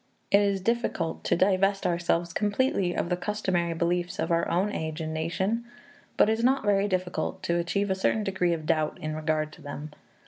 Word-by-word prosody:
It 200 Hz, -, +6 dB
is 200 Hz, -1 st, +1 dB
difficult 210 Hz, -6 st, -1 dB
to -, -, +3 dB
divest 195 Hz, +2 st, +2 dB
ourselves 170 Hz, -1 st, 0 dB
completely 205 Hz, -3 st, +1 dB
of -, -, -1 dB
the 180 Hz, -, +2 dB
customary 180 Hz, -3 st, -1 dB
beliefs 175 Hz, +2 st, -1 dB
of -, -, -1 dB
our 170 Hz, 0 st, +2 dB
own 190 Hz, +5 st, +1 dB
age 160 Hz, -3 st, -4 dB
and 160 Hz, -1 st, -3 dB
nation, 190 Hz, +8 st, -1 dB, 0.5 s
but -, -, +6 dB
it 220 Hz, -, +3 dB
is -, -, -1 dB
not 265 Hz, -1 st, +3 dB
very 200 Hz, 0 st, +3 dB
difficult 185 Hz, -2 st, -2 dB
to 170 Hz, 0 st, +1 dB
achieve 195 Hz, +4 st, 0 dB
a -, -, +4 dB
certain 190 Hz, +3 st, +1 dB
degree 190 Hz, -3 st, +1 dB
of 160 Hz, -2 st, -4 dB
doubt 155 Hz, -1 st, +1 dB
in 155 Hz, 0 st, -4 dB
regard 155 Hz, 0 st, -1 dB
to -, -, -14 dB
them. 145 Hz, +1 st, -7 dB
180 Hz, 200 wpm, -27 LUFS, 165-200 Hz, 0.5 s, It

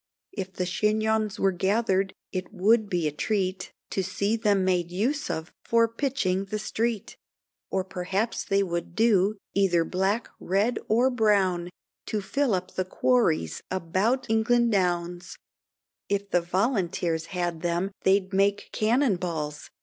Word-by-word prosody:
If 190 Hz, -3 st, -5 dB
the 180 Hz, -, -2 dB
chignons 215 Hz, +2 st, +1 dB
were 195 Hz, -, +3 dB
gathered, 195 Hz, +1 st, +1 dB, 0.2 s
it 185 Hz, +1 st, -4 dB
would 215 Hz, +2 st, +3 dB
be 175 Hz, -4 st, 0 dB
a -, -, -1 dB
treat 185 Hz, +3 st, -2 dB, 0.2 s
To 195 Hz, -, 0 dB
see 200 Hz, +4 st, 0 dB
them 205 Hz, -4 st, +2 dB
made 180 Hz, -2 st, +1 dB
use 235 Hz, +12 st, -1 dB
of 160 Hz, +1 st, -4 dB
for 230 Hz, -1 st, +3 dB
pitching 230 Hz, -6 st, -1 dB
the 215 Hz, +2 st, -3 dB
street, 220 Hz, 0 st, -2 dB, 0.5 s
Or 190 Hz, -1 st, 0 dB
perhaps 195 Hz, +4 st, -2 dB
they 195 Hz, 0 st, +2 dB
would 170 Hz, -2 st, -4 dB
do, 215 Hz, -2 st, +3 dB, 0.2 s
either 180 Hz, -4 st, +3 dB
black, 195 Hz, +6 st, 0 dB
red, 200 Hz, +6 st, +1 dB
or 240 Hz, +5 st, +3 dB
brown, 195 Hz, -7 st, +2 dB, 0.4 s
To 215 Hz, -, -1 dB
fill 245 Hz, +3 st, 0 dB
up 185 Hz, 0 st, -5 dB
the 185 Hz, -, -1 dB
quaries 185 Hz, -, +1 dB
about 190 Hz, +9 st, 0 dB
the 235 Hz, +2 st, +3 dB
Downs: 180 Hz, -3 st, -1 dB, 0.7 s
If 200 Hz, 0 st, -1 dB
the 175 Hz, -, +3 dB
Volunteers 175 Hz, -4 st, 0 dB
had 175 Hz, -3 st, -3 dB
them 175 Hz, +3 st, -1 dB
they'd 190 Hz, 0 st, +2 dB
make 200 Hz, +1 st, +1 dB
cannon 230 Hz, -1 st, +2 dB
balls. 155 Hz, -4 st, -4 dB
195 Hz, 140 wpm, -26 LUFS, 180-220 Hz, 0.7 s, were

